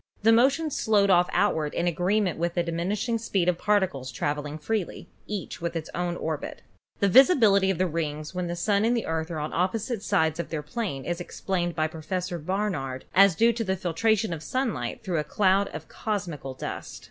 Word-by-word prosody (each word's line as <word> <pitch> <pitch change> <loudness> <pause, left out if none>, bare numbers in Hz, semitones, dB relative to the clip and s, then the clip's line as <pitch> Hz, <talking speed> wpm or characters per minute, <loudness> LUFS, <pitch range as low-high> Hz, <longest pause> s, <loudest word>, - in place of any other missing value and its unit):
The 225 - +6
motion 275 +7 +3
slowed 205 -5 +2
off 175 -1 +4
outward 160 -7 +1
in 170 - 0
agreement 180 +2 +1
with 170 0 -1
the 175 - +2
diminishing 195 +8 -1
speed 195 -5 0
of 180 -1 +1
particles 190 -11 0
traveling 145 +4 -3
freely, 195 +3 -3 0.2
each 205 -5 -5
in 170 - -1
its 160 -2 -4
own 175 0 -2
orbit. 160 -3 -4 0.4
The 200 - +3
visibility 220 - +6
of 190 - 0
the 185 - +2
rings 155 -2 -3
when 180 -1 -2
the 170 - -3
Sun 200 +3 +1
and 235 +2 +2
the 230 - -2
Earth 160 0 -2
are 165 - -4
on 150 0 -4
opposite 210 +5 -1
sides 165 -6 +1
of 170 - -3
their 155 -2 -3
plane 150 - -4
is 175 0 -2
explained 175 -1 -2
by 155 - +1
Pro 160 0 -6
fessor 180 +1 -3
Barnard 160 -7 -2
as 195 -2 +6
due 230 +5 +4
to 230 0 -2
the 190 -2 0
filtration 195 +3 +1
of 160 - -6
sunlight 160 - -2
through 180 -6 -1
a - - 0
cloud 195 +4 +2
of - - -8
cosmical 170 -11 -4
dust. - - -6
180 Hz, 200 wpm, -26 LUFS, 160-210 Hz, 0.4 s, The